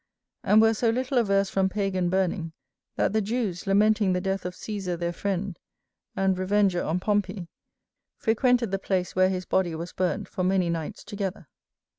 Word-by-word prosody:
And 215 +1 +5
were 225 0 +5
so 230 +1 +1
little 255 +2 +1
averse 200 -3 +2
from 190 -1 +2
Pagan 190 -3 -1
burning, 180 -3 -1 0.4
that - - +1
the 220 - +2
Jews 210 -4 -2
lamenting 205 0 +3
the 180 - +1
death 195 0 -2
of 180 - -7
Cæsar 195 -5 -4
their 170 0 -2
friend, 195 0 -3 0.6
and 195 -1 +2
revenger 190 -1 +2
on 165 +3 -1
Pompey, 195 -3 -1 0.7
frequented 235 -1 +2
the 195 - 0
place 185 -2 -1
where 185 0 +4
his 185 -1 -3
body 175 -3 0
was 170 +2 -6
burnt 185 -1 -1
for 185 - -3
many 185 -2 +2
nights 165 -2 -4
together. 195 - -5
195 Hz, 170 wpm, -26 LUFS, 180-210 Hz, 0.7 s, And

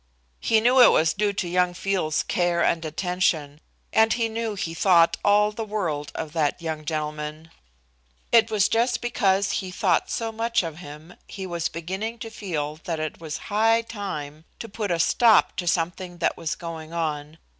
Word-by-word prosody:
He 225 - +3
knew 250 +3 +5
it 245 - +9
was 160 +1 +3
due 205 0 0
to 190 -2 -2
young 180 0 +1
Field's 185 -5 -1
care 175 -1 +1
and 165 -1 +1
attention, 160 -3 -1 0.3
and 220 0 +4
he 230 -2 0
knew 225 -1 -3
he 175 -4 -4
thought 170 -1 +4
all 210 +1 +4
the 225 +1 -5
world 175 -9 -3
of 155 -1 -5
that 155 -2 0
young 160 -2 -5
gentleman. 155 +1 -4 0.8
It 230 -1 +5
was 210 -3 +3
just 240 +2 +1
because 200 -5 +1
he 190 - -2
thought 180 - +1
so 225 -1 -2
much 230 -1 0
of 165 -2 -6
him 155 +1 -11
he 190 -2 -7
was 170 -2 -2
beginning 190 +8 -5
to 225 0 -8
feel 155 -8 -4
that 165 -4 -2
it 155 +1 -5
was 155 -2 -5 0.2
high 225 +2 +3
time 160 -9 -6
to 230 - -7
put 210 -1 -4
a 170 - +1
stop 225 +6 +4
to 175 - -3
something 175 +1 -1
that 170 - 0
was 160 - -3
going 165 -2 -8
on. 155 -2 -3
180 Hz, 180 wpm, -24 LUFS, 160-210 Hz, 0.8 s, it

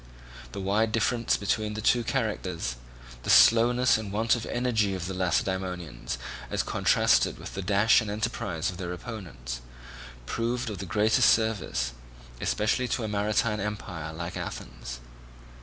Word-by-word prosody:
The - - -5
wide 105 +3 +1
difference 115 +1 +1
between 105 +1 -1
the - - -4
two 120 +2 +3
characters, 90 - -2 0.5
the - - -6
slowness 120 +1 +6
and 105 -3 -6
want 110 +3 +2
of 115 -1 -5
energy 110 -5 +1
of 90 -2 -4
the 95 - -4
Lacedaemonians 90 -7 -2 0.3
as - - 0
contrasted - - +3
with - - -9
the 95 - -3
dash 100 +5 +4
and 110 - -4
enterprise 105 -6 -2
of 90 - -10
their 90 -1 -4
opponents, 85 - -7 0.6
proved 115 - -2
of 100 - -6
the 95 - -5
greatest 110 +4 +4
service, 100 - +1 0.5
especially 110 +4 +1
to 120 0 -1
a - - -1
maritime 105 +2 +1
empire 95 -6 -4
like 85 +2 -6
Athens. - - -6
105 Hz, 145 wpm, -27 LUFS, 90-110 Hz, 0.6 s, slowness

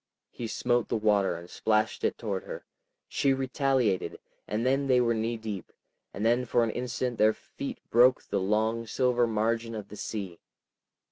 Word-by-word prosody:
He 120 - -5
smote 120 +1 +1
the 115 - +1
water 105 -2 +2
and 85 +1 -9
splashed 110 - 0
it 450 - +1
toward - - -3
her, - - -7 0.4
she 140 -2 +2
retaliated, 130 -6 0 0.3
and 110 +3 -1
then 135 +2 +2
they 130 -2 +5
were 120 -1 +3
knee 115 +1 -1
deep, 110 -4 -6 0.4
and 105 - -3
then 120 +2 +3
for 120 0 +2
an 115 - 0
instant 125 0 -3
their 110 +1 +5
feet - - -7
broke 125 +2 +5
the 100 - -1
long 110 +4 0
silver 125 +1 +2
margin 115 +1 0
of 105 -2 -7
the 105 - -9
sea. 95 -6 -5
115 Hz, 175 wpm, -28 LUFS, 110-125 Hz, 0.4 s, they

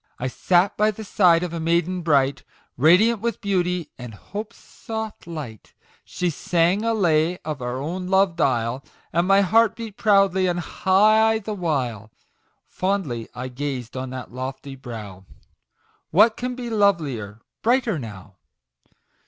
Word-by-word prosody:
* - - -43
# - - -42
* - - -40
# - - -34
I 125 - -3
sat 180 +9 +2
by 215 +1 +3
the 215 +1 -6
side 180 -4 +3
of 175 -2 -4
a 170 - -3
maiden 170 +2 0
bright, 140 -4 +1 0.3
Radiant 190 - +4
with 235 0 -2
Beauty, 180 -5 -1
and 120 -4 -8
Hope's 210 - -8
soft 220 -4 -7
light; 145 -11 -8 0.3
She 180 -1 -2
sang 175 +6 +1
a 230 - +1
lay 170 -3 +2
of 150 -4 -4
our 125 +1 -3
own 175 +7 -4
loved 190 -3 +2
isle, 120 0 0 0.3
And 170 +2 +2
my 195 +1 +5
heart 220 +3 +3
beat 225 -3 -8
proudly 195 -3 +3
and 175 -1 0
high 215 +5 +3
the 215 0 -5
while. 130 - -2 0.6
Fondly 180 - -2
I 125 +1 -5
gazed 130 -2 -5
on 130 0 -4
that 130 -2 -8
lofty 130 +2 -6
brow 110 -7 -9 0.4
" - - -41
What 215 +6 +5
can 250 0 -4
be 240 -2 -6
lovelier 145 - 0 0.2
brighter 235 - +1
now 100 -5 -10
175 Hz, 160 wpm, -23 LUFS, 130-200 Hz, 0.6 s, my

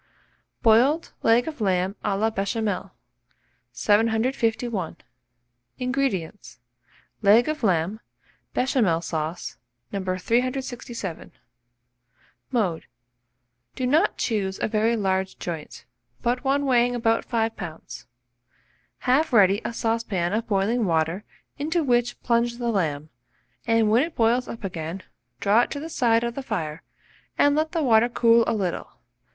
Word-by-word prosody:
BOILED 255 +9 +4
LEG 235 +4 +3
OF 305 -7 -6
LAMB 185 -1 +1
A 200 -2 0
LA 220 +2 +1
BECHAMEL. 200 -2 -2 0.8
751. 225 - 0 0.8
INGREDIENTS. 250 -9 -2 0.6
Leg 215 +3 +5
of 310 0 -2
lamb, 190 0 +1 0.6
Béchamel 215 -11 +1
sauce, 160 +1 -4 0.3
No. 200 -1 -3
367. 235 0 -2 1.2
Mode. 195 -10 -1 0.9
Do 255 - -2
not 310 +10 +2
choose 195 -4 -1
a - - +2
very 220 +2 +1
large 190 -2 -1
joint, 165 -4 -7 0.4
but 245 +1 0
one 280 +1 +1
weighing 245 -2 +3
about 225 -1 +1
5 225 -2 -1
lbs. 155 -9 -8 1.0
Have 270 +5 +2
ready 205 -2 +5
a - - -3
saucepan 225 -6 -1
of 225 +2 -1
boiling 210 +3 +1
water, 165 +2 0 0.4
into 315 +3 0
which 245 -2 +1
plunge 235 0 +1
the 240 -1 -2
lamb, 155 -8 -1 0.6
and 225 -2 +3
when 230 +3 +5
it 325 +2 -3
boils 235 +2 +2
up 230 - -8
again, 175 0 -5 0.4
draw 205 +4 +4
it - - -1
to 285 - -4
the 320 +3 -6
side 235 -6 +2
of 235 0 -2
the 275 - -5
fire, 165 - -4 0.6
and 285 0 +4
let 310 +1 0
the 330 -2 0
water 235 -2 +4
cool 230 -1 +4
a - - +1
little. 190 -5 -3
225 Hz, 130 wpm, -24 LUFS, 190-245 Hz, 1.2 s, Leg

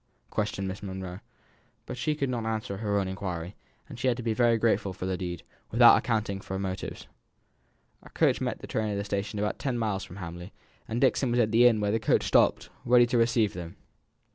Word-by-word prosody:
questioned 105 -2 -2
Miss 95 +1 -5
Monro; 95 -2 -6 0.7
but - - -6
she 150 +5 -1
could 140 -2 -1
not 120 -3 -2
answer 110 -3 -3
her 105 -1 -1
own 95 - -1
inquiry, 95 -2 -5 0.3
and 130 -5 -10
had 125 -1 +1
to 125 - -5
be 115 -1 0
very 120 0 +3
grateful 110 -4 +1
for 95 - -6
the 95 0 -1
deed, 90 -2 -5 0.3
without - - +7
accounting 105 -3 -1
for 95 - -6
the - - -2
motives. 95 -1 -5 1.0
A - - -15
coach - - +2
met - - -2
the - - -7
train 110 -1 -2
at 100 - -2
a 100 - -2
station 100 +1 -3
about 105 +1 -2
ten 130 -4 -1
miles 105 -4 -1
from 90 - -10
Hamley, 90 -1 -8 0.3
and 115 - -2
Dixon 130 0 +2
was 120 +1 +1
at 110 -2 +2
the 120 +2 +6
inn 115 -3 +3
where 105 -1 0
the 110 - +1
coach - - +2
stopped, - - +2
ready 120 0 +6
to 120 +1 0
receive 115 -3 +2
them. 85 -1 -7
105 Hz, 220 wpm, -28 LUFS, 95-120 Hz, 1.0 s, without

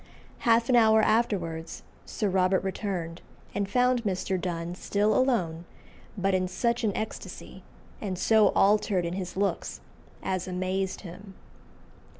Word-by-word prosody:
Half 230 0 +4
an 255 - +3
hour 220 -2 +5
afterwards 180 -8 0 0.2
Sir 215 - -2
Robert 190 0 +2
returned, 185 -4 -4 0.3
and 200 -1 -2
found 250 +1 +2
Mr. 190 -2 -1
Donne 170 -1 -3
still 205 +3 0
alone, 180 -11 +1 0.5
"but 195 0 +1
in 185 0 +1
such 235 +6 -1
an 215 - +2
ecstasy, 220 - -6 0.4
and 190 -4 -3
so 220 +3 +4
altered 200 -2 +3
in 170 - -3
his 185 -1 -5
looks," 200 0 -1 0.4
as 185 -1 -2
amazed 185 +1 -2
him. 190 +1 -11
195 Hz, 135 wpm, -27 LUFS, 180-220 Hz, 0.5 s, hour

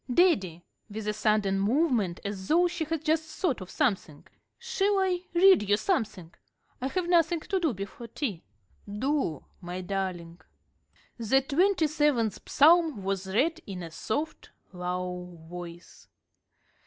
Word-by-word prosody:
Daddy" 195 - +2 0.3
with 210 0 -6
a 210 - +1
sudden 210 -2 +1
movement, 220 - +1
as 195 -2 -5
though 350 +3 +4
she 340 -2 -3
had 315 0 -3
just 315 0 +2 0.2
thought 285 - 0
of 185 - -8
something 195 - -1 0.3
"shall 440 -4 0
I 375 -2 +1 0.2
read 355 - +6
you 205 - +4
something? 215 - -2 0.5
I 260 - 0
have 360 +5 -2
nothing 340 -1 +3
to 385 +3 -1
do 325 -5 +1
before 200 +3 -7
tea." 220 - -4 0.5
"Do, 255 - -1 0.2
my 180 +1 -5
darling." 180 -3 -4 0.8
The 235 +4 +3
twenty 345 +5 +2
seventh 295 -8 +1
Psalm 315 - +4
was 195 0 -2
read 300 - +1
in 185 -3 -6
a 165 - -8
soft, 290 - -4 0.2
low 180 0 -4
voice. 175 0 -10
225 Hz, 140 wpm, -28 LUFS, -, 0.8 s, read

